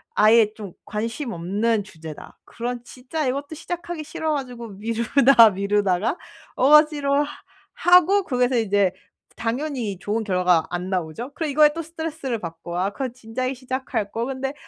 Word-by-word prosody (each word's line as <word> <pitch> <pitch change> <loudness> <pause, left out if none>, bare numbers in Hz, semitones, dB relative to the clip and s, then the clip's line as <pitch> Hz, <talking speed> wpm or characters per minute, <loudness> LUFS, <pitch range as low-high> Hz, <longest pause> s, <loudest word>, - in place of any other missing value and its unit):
아예 215 0 +5
좀 205 -5 -8
관심 230 +4 -4
없는 205 +5 0
주제다. 160 -6 -11
그럼 245 +1 -4
진짜 265 +4 -4
이것도 285 +4 -3
시작하기 340 -1 -5
싫어 315 +1 -3
가지고 245 -4 -6
미루다, 230 +3 +4
미루다가 200 - 0 0.4
억지로 290 0 +4 0.5
하고 360 +3 +5
거기서 250 -5 +1
이제 200 -3 +2 0.4
당연히 235 - -3
좋은 215 +3 -2
결과가 180 -4 +2
안 180 +1 -4
나오죠. 185 - -3
그리고 320 -3 -3
이거에 300 +1 +5
또 330 - -4
스트레스를 320 -7 -4
받고 170 0 -7
'아 195 +2 0
그건 260 +2 -4
진작에 255 +2 -4
시작할 255 -4 -3
걸.' 230 +2 -2
근데 270 0 -3
235 Hz, 330 characters per minute, -23 LUFS, 205-280 Hz, 0.5 s, 아예